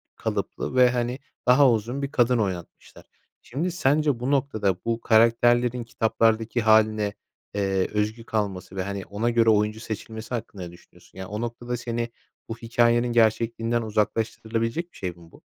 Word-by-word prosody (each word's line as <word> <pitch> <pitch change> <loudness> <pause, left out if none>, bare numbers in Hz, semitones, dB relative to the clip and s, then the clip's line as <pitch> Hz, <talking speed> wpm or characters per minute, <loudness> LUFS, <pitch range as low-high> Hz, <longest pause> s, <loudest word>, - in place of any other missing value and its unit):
kalıplı - - -3
ve, 125 -1 +6
hani, 125 +1 -2 0.3
daha 130 +1 +6
uzun 120 +5 -2
bir 140 0 -3
kadın 125 -1 +3
oynatmışlar. 95 -5 -5 0.4
Şimdi, 160 +9 -3
sence, 145 -5 +1
bu 125 +3 -1
noktada, 110 -9 +1
bu 115 0 -1
karakterlerin 120 +2 +3
kitaplardaki 115 0 +1
hâline, 110 -1 +3 0.4
eee, 95 -2 0
özgü 105 +2 -1
kalması 100 -5 -3
ve, 95 - -1
hani, 100 -1 -5
ona 105 +4 -1
göre 115 -1 +3
oyuncu 105 0 +2
seçilmesi 110 +1 -7
hakkında 105 -5 -6
ne 85 - -8
düşünüyorsun? 85 +1 -19
Yani, 95 0 -6
o 105 +3 -5
noktada, 120 +1 -4
seni 120 0 -3 0.4
bu 115 - -5
hikâyenin 120 +1 +2
gerçekliğinden 115 +1 +2
uzaklaştırılabilecek 115 +7 -2
bir - - -16
şey 95 - -3
mi - - -19 0.2
bu? - - -18
115 Hz, 155 wpm, -25 LUFS, 105-120 Hz, 0.4 s, ve